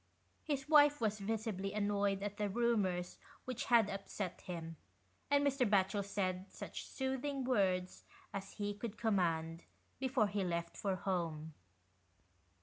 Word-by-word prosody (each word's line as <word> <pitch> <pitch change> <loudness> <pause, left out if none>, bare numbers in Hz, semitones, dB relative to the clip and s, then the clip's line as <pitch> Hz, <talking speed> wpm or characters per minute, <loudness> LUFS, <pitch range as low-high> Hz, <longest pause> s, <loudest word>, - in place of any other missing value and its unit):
His 275 -3 -2
wife 295 -1 +7
was 215 -2 0
visibly 205 -2 -2
annoyed 205 -1 +1
at 205 0 -3
the 210 -1 0
rumours 200 -5 +1 0.3
which 255 -2 -3
had 235 -4 +5
upset 195 -2 -4
him, 165 -2 -6 0.5
and 285 0 +4
Mr. 275 -2 +2
Batchel 200 0 +3
said 190 -1 -2
such - - -7
soothing 265 +1 -2
words 190 -7 +1 0.3
as 195 -1 -5
he 205 -1 -2
could 215 +1 -6
command, 165 -6 0 0.3
before 260 -3 +2
he 205 -1 -1
left 170 -1 -2
for 195 -2 -1
home. 165 -4 -2
200 Hz, 135 wpm, -36 LUFS, 185-235 Hz, 0.5 s, wife